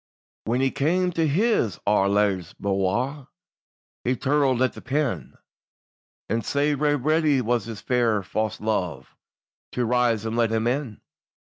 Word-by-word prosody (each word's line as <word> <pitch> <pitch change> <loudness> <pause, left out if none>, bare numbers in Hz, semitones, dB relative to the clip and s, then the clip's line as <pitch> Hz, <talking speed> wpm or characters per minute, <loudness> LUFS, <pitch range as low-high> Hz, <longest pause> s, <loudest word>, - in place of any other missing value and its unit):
WHAN 120 +4 0
he 135 0 +2
cam 180 +5 +1
to 165 -2 +1
his 155 - +1
ain 100 -1 +3
luve's 100 -4 0
bouir 110 +9 -1 0.8
He 125 +1 +1
tirled 135 -1 +2
at 130 - +1
the - - -10
pin, 140 0 -2 0.9
And 115 0 -1
sae 145 +6 +1
ready 145 +1 +2
was 120 -2 0
his 115 -2 -7
fair 115 -5 +1
fause 110 +3 -2
luve 105 -6 -2 0.7
To 125 - 0
rise 120 -2 +1
and 110 0 -2
let 115 -1 +2
him 110 0 0
in. 125 -3 -2
120 Hz, 140 wpm, -24 LUFS, 110-145 Hz, 0.9 s, ain